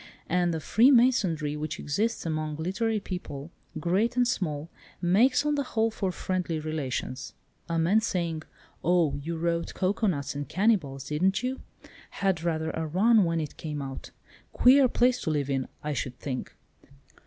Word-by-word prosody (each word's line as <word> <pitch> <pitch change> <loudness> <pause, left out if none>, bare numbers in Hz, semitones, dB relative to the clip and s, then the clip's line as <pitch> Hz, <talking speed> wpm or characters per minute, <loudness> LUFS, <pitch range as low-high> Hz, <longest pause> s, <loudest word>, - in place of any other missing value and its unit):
And 175 0 +2
the 160 - -2
freemasonry 215 - +3
which 155 +1 -4
exists 210 +11 -1
among 155 -1 -2
literary 195 +8 -1
people, 170 -6 -6 0.3
great 195 +9 +1
and 245 -1 +4
small, 160 -8 -2 0.3
makes 245 +11 +3
on 295 - +2
the 290 - +1
whole 225 -4 0
for 195 -3 -2
friendly 180 -3 -2
relations. 140 -4 -4 0.4
A 165 - 0
man 180 +7 +3
says: 170 -7 -1 0.4
'Oh, 170 -3 +3
you 165 +3 -4
wrote 170 0 -1
Cocoanuts 185 - 0
and 145 0 -5
Cannibals, 175 - +1
didn't 185 +9 +1
you? 260 +1 -2 0.5
Had 190 -4 0
rather 160 -1 -1
a 160 0 -3
run 205 +5 +4
when 165 -1 0
it 150 -3 -5
came 150 -2 -5
out. 135 -1 -6 0.4
Queer 265 +1 +6
place 250 +1 +2
to - - -2
live 145 -3 0
in, 135 -1 -1 0.2
I 150 0 -2
should 125 -1 -4
think. 130 -3 -5
170 Hz, 155 wpm, -27 LUFS, 150-215 Hz, 0.5 s, Queer